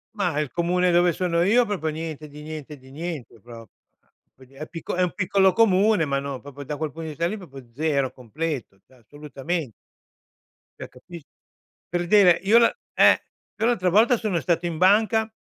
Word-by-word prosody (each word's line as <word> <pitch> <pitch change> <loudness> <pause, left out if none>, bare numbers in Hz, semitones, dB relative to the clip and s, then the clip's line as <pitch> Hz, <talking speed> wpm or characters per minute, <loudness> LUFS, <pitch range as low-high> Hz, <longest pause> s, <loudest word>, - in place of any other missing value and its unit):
Ma 175 -7 -1
il 150 -4 -3
comune 180 +1 +1
dove 175 0 +4
sono 170 0 -1
io 230 +6 +4
proprio 190 -7 -3
niente 155 -1 -6
di 150 +1 -12
niente, 155 -1 -8
di 130 0 -17
niente, 150 -7 -7
proprio, 115 -1 -13 0.6
quindi 130 +1 -19
è 155 +3 -8
picco 165 - -6
è 185 - 0
un 180 - +1
piccolo 190 -1 +2
comune, 205 -4 +3
ma 140 -1 -1
no 140 -1 -5
proprio 145 +1 -10
da 150 +1 -5
quel 155 -1 -3
punto 165 - -9
di 160 - -5
vista 160 +3 -3
lì 210 - -3
proprio 140 -8 -11
0, 140 -2 0
completo, 130 -4 -5
cioè - - -26
assolutamen 145 +3 -6 1.1
Cioè - - -7
capis 165 +5 -13 0.7
per 175 0 -2
dire, 180 -4 +5
io 215 +4 +5
la 235 - +4 0.2
eh, - - +5 0.3
io 225 - 0
l'altra 210 -7 +1
volta 225 +6 +4
sono 210 -7 -1
stato 170 +1 -1
in 165 -2 -3
banca 220 +4 +3
165 Hz, 185 wpm, -24 LUFS, 145-185 Hz, 1.1 s, dire